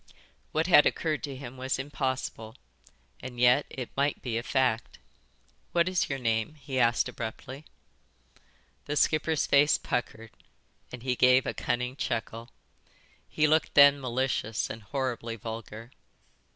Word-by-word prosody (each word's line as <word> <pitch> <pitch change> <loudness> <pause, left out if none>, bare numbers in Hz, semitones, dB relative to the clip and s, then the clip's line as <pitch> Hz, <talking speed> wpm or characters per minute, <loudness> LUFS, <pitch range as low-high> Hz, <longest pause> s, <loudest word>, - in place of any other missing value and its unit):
What 160 +1 0
had 170 -4 +6
occurred 155 -2 -1
to 140 -2 -7
him 130 -1 -9
was 130 +1 -2
impossible, 130 -5 -4 0.6
and 125 -1 -8
yet 125 +3 +4
it 125 -3 -7
might 140 +1 0
be 120 -3 -3
a 115 - 0
fact. 125 -2 0 0.8
"What 170 0 +3
is 185 -1 0
your 135 - -2
name?" 115 +3 -1
he 135 -3 -4
asked 120 -1 +3
abruptly. 125 +5 -7 1.2
The 150 - -3
skipper's 155 +1 +1
face 145 +1 +4
puckered 115 -2 -4 0.6
and 125 -2 -9
he 130 -1 0
gave 125 +1 +4
a - - -2
cunning 125 +1 -2
chuckle. 115 -2 -4 0.8
He 155 - +1
looked 155 +1 +2
then 140 -1 +7
malicious 125 -4 -2
and 110 - -8
horribly 120 0 -3
vulgar. 115 +1 -8
130 Hz, 140 wpm, -28 LUFS, 115-140 Hz, 1.2 s, then